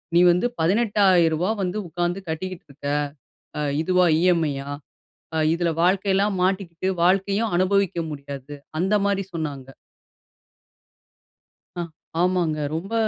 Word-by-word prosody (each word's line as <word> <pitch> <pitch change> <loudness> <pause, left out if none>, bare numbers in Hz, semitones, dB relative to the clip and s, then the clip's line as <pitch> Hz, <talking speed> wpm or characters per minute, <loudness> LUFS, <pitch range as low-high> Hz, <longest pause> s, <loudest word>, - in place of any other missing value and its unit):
நீ - - +7
வந்து 180 +6 +1
ரூ.18000 190 -1 +3
வந்து 185 +2 -2
உட்காந்து 175 +3 -2
கட்டிக்கிட்டு 180 +3 -5
இருக்க, 140 +1 -8 0.7
அ - - -1 0.2
இதுவா 180 +1 +3
இ.எம்.ஐ.யா. 160 -6 +1 0.7
அ - - -1 0.2
இதில 170 0 0
வாழ்க்கையெல்லாம் 195 +2 +2
மாட்டிக்கிட்டு, 185 -2 -1 0.2
வாழ்க்கையும் 195 +4 +2
அனுபவிக்க 195 0 +2
முடியாது." 140 -1 -7 0.3
அந்த 190 +4 +1
மாதிரி 200 -1 0
சொன்னாங்க. 145 -5 -4 2.1
ஆ, 175 - -3 0.4
ஆமாங்க 175 -4 +1 0.2
ரொம்ப 190 +7 -5
180 Hz, 105 wpm, -23 LUFS, 160-195 Hz, 2.1 s, நீ